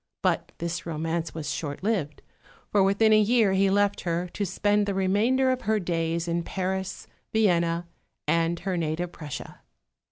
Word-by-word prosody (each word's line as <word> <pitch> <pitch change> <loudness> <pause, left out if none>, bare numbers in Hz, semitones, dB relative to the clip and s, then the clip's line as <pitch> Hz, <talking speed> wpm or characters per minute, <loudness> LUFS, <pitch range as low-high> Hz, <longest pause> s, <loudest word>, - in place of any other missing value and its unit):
But - - +1
this 170 0 -4
romance 165 +1 -2
was 160 -2 -3
short 145 +1 -4
lived, 190 -9 -1 0.5
for 205 - +4
within 200 +3 +4
a 215 - +7
year 215 -2 +3
he 195 +1 +3
left 205 +1 +2
her, 175 +1 -1
to 200 - -3
spend 205 +3 +1
the 200 - -1
remainder 220 +8 +2
of 255 0 -1
her 215 +1 +1
days 170 -2 -1
in 170 0 0
Paris, 190 +2 -3 0.3
Vienna, 170 -5 +2 0.4
and 165 +2 +1
her 185 0 -1
native 165 +2 -2
Prussia. 150 -5 -8
185 Hz, 160 wpm, -26 LUFS, 165-205 Hz, 0.5 s, a